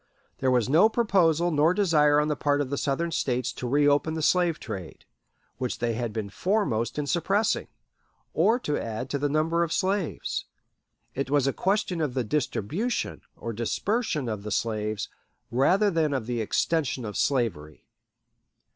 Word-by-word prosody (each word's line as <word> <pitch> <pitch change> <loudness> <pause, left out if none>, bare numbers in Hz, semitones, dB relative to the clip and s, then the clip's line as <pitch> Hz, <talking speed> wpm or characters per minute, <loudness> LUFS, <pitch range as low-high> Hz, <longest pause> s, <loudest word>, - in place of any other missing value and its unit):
There 130 - +1
was 125 -3 +2
no 165 +11 +5
proposal 175 -7 +2
nor 155 +3 +3
desire 150 -7 +4
on 150 - +1
the 150 - 0
part 145 0 +1
of 140 -2 -2
the 140 - -1
Southern 165 +4 -1
States 125 -4 -1
to 125 - -5
reopen 145 +3 +2
the 160 - -3
slave 175 0 +2
trade, 90 -5 -8 0.5
which 125 -2 -2
they 120 -1 -1
had 115 0 -3
been 105 -2 -4
foremost 150 - 0
in 150 - -1
suppressing, 195 +9 +1 0.7
or 230 +3 +3
to 150 -8 -1
add 115 +3 -5
to 140 - -1
the 145 +1 0
number 160 +3 +1
of 170 -2 0
slaves. 190 -2 -1 0.7
It 135 0 -3
was 145 -2 +2
a 135 - +1
question 190 -3 0
of 140 -5 -1
the 130 - +1
distribution, 150 - -2 0.2
or 115 - -5
dispersion, 150 - -1
of 105 -3 -3
the 105 - -6
slaves, 110 -1 -1 0.4
rather 185 - +3
than 155 -4 +1
of 125 -5 -2
the 120 -1 -2
"extension 135 +2 0
of 105 -2 -6
slavery." 95 - -1
145 Hz, 165 wpm, -26 LUFS, 120-170 Hz, 0.7 s, no